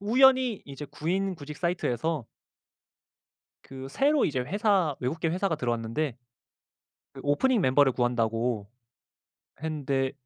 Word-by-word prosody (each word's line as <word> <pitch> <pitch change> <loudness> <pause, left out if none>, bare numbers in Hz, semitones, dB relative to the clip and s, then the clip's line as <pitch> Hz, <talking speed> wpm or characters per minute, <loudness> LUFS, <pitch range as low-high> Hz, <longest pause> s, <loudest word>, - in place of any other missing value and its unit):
우연히 255 +1 +4
이제 140 +1 -8
구인 185 +6 -1
구직 150 -1 -9
사이트에서 165 -5 -1 1.4
그 135 0 -9
새로 285 - +2
이제 130 -4 0
회사 190 - +1
외국계 160 +6 -1
회사가 180 -1 0
들어왔는데 120 +2 -2 1.0
그 - - -10
오프닝 220 - +2
멤버를 130 -2 +4
구한다고 115 -3 0 0.9
했는데 140 -4 -1
150 Hz, 270 characters per minute, -28 LUFS, 130-185 Hz, 1.4 s, 우연히